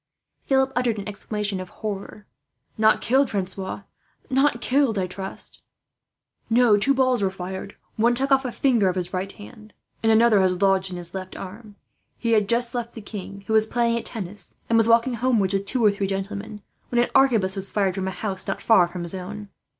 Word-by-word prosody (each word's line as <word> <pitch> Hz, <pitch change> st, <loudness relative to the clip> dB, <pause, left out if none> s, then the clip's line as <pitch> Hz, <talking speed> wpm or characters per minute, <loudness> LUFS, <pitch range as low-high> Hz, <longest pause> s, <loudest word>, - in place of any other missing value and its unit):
Philip 265 Hz, -1 st, +2 dB
uttered 240 Hz, -3 st, +1 dB
an 200 Hz, -, -6 dB
exclamation 210 Hz, -1 st, -3 dB
of 185 Hz, -1 st, -7 dB
horror. 210 Hz, 0 st, -6 dB, 0.5 s
"Not 220 Hz, 0 st, +3 dB
killed, 265 Hz, +1 st, +2 dB
Francois; 190 Hz, 0 st, -4 dB, 0.5 s
not 270 Hz, -2 st, +2 dB
killed, 255 Hz, -3 st, +1 dB
I 190 Hz, -, 0 dB
trust?" 190 Hz, +1 st, -5 dB, 0.9 s
"No; 235 Hz, -2 st, +5 dB
two 275 Hz, +7 st, +3 dB
balls 255 Hz, -3 st, +2 dB
were 195 Hz, -, +2 dB
fired, 190 Hz, +1 st, -7 dB, 0.2 s
one 235 Hz, +2 st, +3 dB
took 270 Hz, +3 st, 0 dB
off 270 Hz, 0 st, +4 dB
a 250 Hz, -, -3 dB
finger 235 Hz, -7 st, +2 dB
of 180 Hz, -, -2 dB
his 180 Hz, 0 st, -4 dB
right 190 Hz, +1 st, -3 dB
hand, 215 Hz, +1 st, -14 dB, 0.3 s
and 225 Hz, -, +3 dB
another 220 Hz, -1 st, +5 dB
has 185 Hz, -1 st, +2 dB
lodged 195 Hz, -1 st, +2 dB
in 180 Hz, -, -6 dB
his 175 Hz, -1 st, -6 dB
left 185 Hz, -1 st, -6 dB
arm. 205 Hz, +2 st, -10 dB, 0.4 s
He 230 Hz, -, -1 dB
had 210 Hz, -3 st, +3 dB
just 235 Hz, 0 st, +2 dB
left 240 Hz, -1 st, -4 dB
the 225 Hz, -, -7 dB
king, 200 Hz, -1 st, -8 dB
who 220 Hz, -, -2 dB
was 220 Hz, 0 st, +4 dB
playing 235 Hz, 0 st, +1 dB
at 235 Hz, -, -3 dB
tennis, 200 Hz, -3 st, -3 dB, 0.2 s
and -, -, +4 dB
was 225 Hz, -1 st, +5 dB
walking 230 Hz, +2 st, +4 dB
homewards 230 Hz, -5 st, +1 dB
with 195 Hz, 0 st, -1 dB
two 245 Hz, -1 st, +1 dB
or 210 Hz, -, +6 dB
three 200 Hz, -1 st, -2 dB
gentlemen, 200 Hz, +2 st, -5 dB, 0.3 s
when 240 Hz, -, -2 dB
an 240 Hz, -, +1 dB
arquebus 225 Hz, -8 st, +3 dB
was 195 Hz, 0 st, -3 dB
fired 195 Hz, -3 st, 0 dB
from 190 Hz, 0 st, -3 dB
a -, -, 0 dB
house 190 Hz, 0 st, -4 dB
not -, -, -2 dB
far 190 Hz, -6 st, +4 dB
from 175 Hz, 0 st, -6 dB
his 170 Hz, -, +3 dB
own. 200 Hz, +2 st, -7 dB
210 Hz, 205 wpm, -24 LUFS, 190-235 Hz, 0.9 s, or